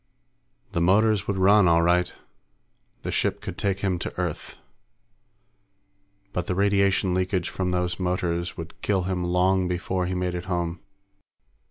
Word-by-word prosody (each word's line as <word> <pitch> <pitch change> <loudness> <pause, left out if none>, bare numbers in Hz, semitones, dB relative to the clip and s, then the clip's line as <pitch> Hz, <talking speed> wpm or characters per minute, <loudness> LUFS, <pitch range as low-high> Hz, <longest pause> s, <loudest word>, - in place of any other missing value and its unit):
The 85 - -1
motors 105 +3 +3
would 100 - -1
run, 100 +1 +5
all 85 0 +4
right. 90 +1 +2 0.9
The - - -3
ship - - 0
could - - -6
take 100 -1 -1
him 95 -3 0
to 85 - -5
Earth. 90 -4 -4 1.8
But 90 - -2
the 90 - -1
radiation 100 -1 +2
leakage 90 -1 0
from 90 +1 -2
those 90 0 -1
motors 90 -1 -1
would 85 -1 -9
kill 95 -3 +1
him 90 -1 -2
long 90 +1 +2
before 90 +1 -2
he 90 - -2
made 90 0 -1
it 90 0 -4
home. 85 -2 -2
90 Hz, 150 wpm, -25 LUFS, 90-95 Hz, 1.8 s, run